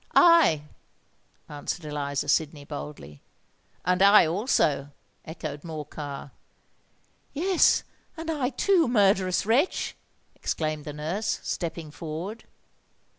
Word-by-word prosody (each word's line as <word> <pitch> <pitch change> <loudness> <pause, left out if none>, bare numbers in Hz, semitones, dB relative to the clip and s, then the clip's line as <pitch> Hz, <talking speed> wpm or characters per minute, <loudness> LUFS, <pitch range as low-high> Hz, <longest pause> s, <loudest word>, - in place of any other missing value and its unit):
"I!" 335 - +6 0.8
answered 150 +3 -5
Eliza 145 -1 -3
Sydney, 145 0 0
boldly. 140 - -8 0.6
"And 180 +1 +2
I 200 -1 +8
also!" 160 - +1 0.4
echoed 155 -3 -6
Morcar. 150 -3 -7 1.0
"Yes—and 330 -1 +1
I 280 -5 0
too, 340 +5 +2
murderous 195 -6 +3
wretch!" 250 - +1 0.4
exclaimed 155 -2 -3
the 150 - -6
nurse, 165 +9 -2
stepping 165 -3 -4
forward. 170 +9 -6
165 Hz, 90 wpm, -26 LUFS, 150-220 Hz, 1.0 s, I